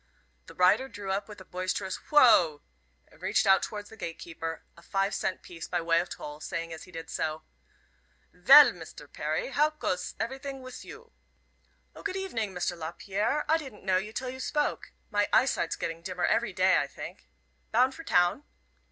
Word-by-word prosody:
The - - -12
rider 185 +9 +4
drew 205 -4 -5
up 195 +2 -1
with 210 - -10
a - - -12
boisterous 185 +1 -4
"Woa!" 180 - +6 0.5
and - - -22
reached 195 +2 +2
out 195 -1 +6
towards 205 -1 -5
the - - -10
gate 165 -6 -6
keeper 165 -1 -6
a 170 - -16
five 195 +3 -1
cent 190 -1 -2
piece 170 -2 -8
by 175 - -1
way 165 0 +2
of 175 - -3
toll, 150 0 -8
saying 165 0 -4
as 160 - -9
he 180 - -16
did 165 -1 -7
so: 155 0 -3 0.9
"Vell, - - +9
Mister - - -11
Perry, - - -3
how 300 +1 +3
coes 185 -12 -3
everytings 265 +3 -4
wiss 255 -1 -9
you?" 460 +1 -12 0.8
"O, - - -10
good 400 -2 -3
evening, 240 - -2
Mr. 180 -1 -2
Lapierre; 195 - -2
I 320 +1 +3
didn't 265 -10 -10
know 190 -1 +3
you 205 +3 -3
till 250 +2 -4
you 260 - -9
spoke. 295 +3 -1 0.2
My 205 -1 +2
eyesight's 250 -10 +2
getting 165 0 -4
dimmer 180 0 -2
every 230 -2 +1
day, 185 0 +4
I - - -1
think. - - -10 0.4
Bound 255 +4 +4
for 325 - -10
town?" 180 - +2
195 Hz, 185 wpm, -29 LUFS, 175-255 Hz, 0.9 s, Vell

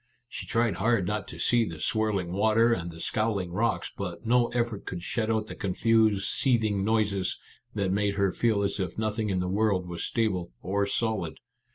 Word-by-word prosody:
She - - -7
tried 115 -5 +1
hard 105 -1 +2
not 105 +3 -2
to - - -9
see 120 -1 +3
the 85 -7 -5
swirling 100 -1 0
water 110 +4 +4
and 85 -5 -3
the 80 -1 -10
scowling 105 -3 -1
rocks, 110 +5 0
but 95 +2 -5
no 120 +1 +4
effort 120 -3 -2
could 90 -2 -5
shut 110 +3 -1
out 110 -1 +1
the - - -8
confused 105 0 +2
seething 110 -7 +2
noises 105 -3 +1 0.4
that 100 -3 0
made 100 0 +1
her 100 -2 +2
feel 110 -4 +1
as 100 - -1
if 95 - -3
nothing 110 0 -1
in 95 -2 0
the 90 - -1
world 95 -2 +1
was 85 -1 -5
stable 100 - -1
or 100 +2 0
solid. 100 -8 -1
105 Hz, 190 wpm, -28 LUFS, 95-110 Hz, 0.4 s, water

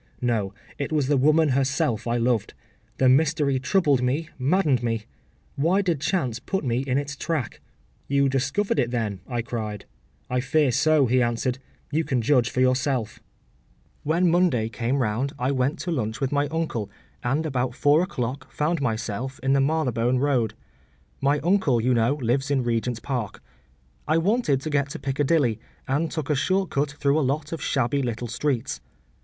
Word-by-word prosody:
No; 115 -6 0 0.3
it 140 - -3
was 150 -3 +1
the 145 +2 +2
woman 155 +3 +4
herself 130 -4 0
I 120 +1 +1
loved. 120 -3 0 0.4
The 130 - +3
mystery 140 0 +3
troubled 145 -3 +2
me, 140 +6 -1
maddened 145 -2 +2
me. 115 -2 -1 0.5
Why 175 +8 +2
did 170 -7 0
chance 130 - -1
put 190 +9 -3
me 120 -2 0
in 135 -1 0
its 145 0 -3
track?’ 145 - -3 0.5
‘You 140 0 +3
discovered 140 - 0
it, 120 - +1
then?’ 110 -5 -2
I 120 -2 -2
cried. 110 -4 -5 0.4
‘I 125 - 0
fear 135 +2 +2
so,’ 155 +3 +3
he 125 +1 +2
answered. 120 +2 -1 0.3
‘You 160 +2 +1
can 130 -6 -1
judge 125 -1 +3
for 130 - -1
yourself.’ 130 -3 +1 0.8
‘When 170 +3 +2
Monday 165 -11 +2
came 120 +4 -1
round 125 +2 -1
I 125 +2 0
went 135 +2 0
to 175 - -3
lunch 110 -7 -2
with 135 - -1
my 145 0 +1
uncle, 155 -9 -2 0.3
and 140 +6 0
about 130 -4 -1
four 145 +3 +4
o’clock 130 -6 -4
found 155 +1 -1
myself 115 +1 -3
in 135 0 +2
the 140 - +3
Marylebone 130 -5 +1
Road. 125 -5 +1 0.7
My 140 +2 +3
uncle, 165 -7 +2
you 125 +3 +2
know, 115 +4 +2
lives 135 0 0
in 135 -3 +1
Regent’s 120 0 -1
Park. 125 -6 -3 0.7
I 155 +1 +3
wanted 170 - +1
to 155 - -4
get 140 -1 +1
to - - -5
Piccadilly, 135 -3 +1 0.3
and 145 +5 0
took 155 -2 -3
a - - +3
short 190 +6 0
cut 140 +1 0
through 145 0 +1
a 135 -4 +1
lot 145 +2 -2
of 165 -3 -4
shabby 135 0 0
little 120 -1 -3
streets. 125 +1 -2
135 Hz, 175 wpm, -25 LUFS, 120-150 Hz, 0.8 s, woman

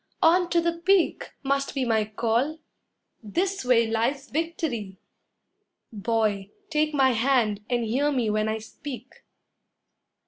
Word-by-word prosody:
On 350 +2 +4
to 345 - +3
the 340 0 +1
peak, 370 0 +2
Must 275 +1 -1
be 265 -2 0
my 220 -2 +2
call 230 +8 0 0.6
this 365 - -2
way 245 -2 +4
lies 235 +6 -1
victory! 295 - -3 1.0
Boy, 210 -2 0 0.2
take 305 0 +1
my 265 -2 +4
hand 225 -4 +1
and 240 -1 +1
hear 275 +7 +1
me 250 -5 0
when 215 +1 0
I 220 - -1
speak. 245 +3 -9
250 Hz, 130 wpm, -26 LUFS, 220-300 Hz, 1.0 s, On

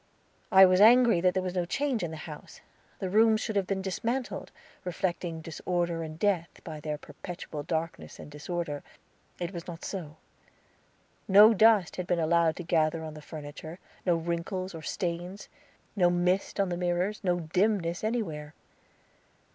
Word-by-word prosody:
I 190 0 +9
was 185 +1 +4
angry 235 -3 +7
that 180 0 +3
there 185 - +1
was 180 -1 -3
no 180 -1 0
change 275 +4 -1
in 170 - -2
the 160 - -7
house. 150 -1 -10 0.4
The 190 - -3
rooms 220 +3 +4
should 220 - -3
have 195 -2 +1
been 190 -1 -2
dismantled, 235 +7 -3 0.3
reflecting 175 -2 -3
disorder 170 +1 -2
and 155 -1 -6
death, 180 -3 +1
by 155 -2 -7
their 150 0 -3
perpetual 160 -1 -8
darkness 160 +2 -4
and - - -11
disorder. 150 0 -4 0.6
It 175 +1 -4
was 170 -2 -7
not 170 -2 -7
so. 160 -6 -6 1.1
No 210 +3 +8
dust 215 -4 +4
had 180 -1 -3
been 175 - +1
allowed 165 0 +2
to 180 - -6
gather 160 -1 +1
on 155 -1 -6
the 155 - -10
furniture, 155 +2 -8 0.3
no 175 -2 +3
wrinkles 170 +3 -3
or 165 - -7
stains. 175 +3 -4 0.5
No 180 -4 +4
mist 180 +3 0
on 195 -2 +2
the 175 - -2
mirrors, 180 +4 -1
no 175 -2 +1
dimness 175 +1 0
anywhere. 160 -10 -3
175 Hz, 165 wpm, -29 LUFS, 165-195 Hz, 1.1 s, I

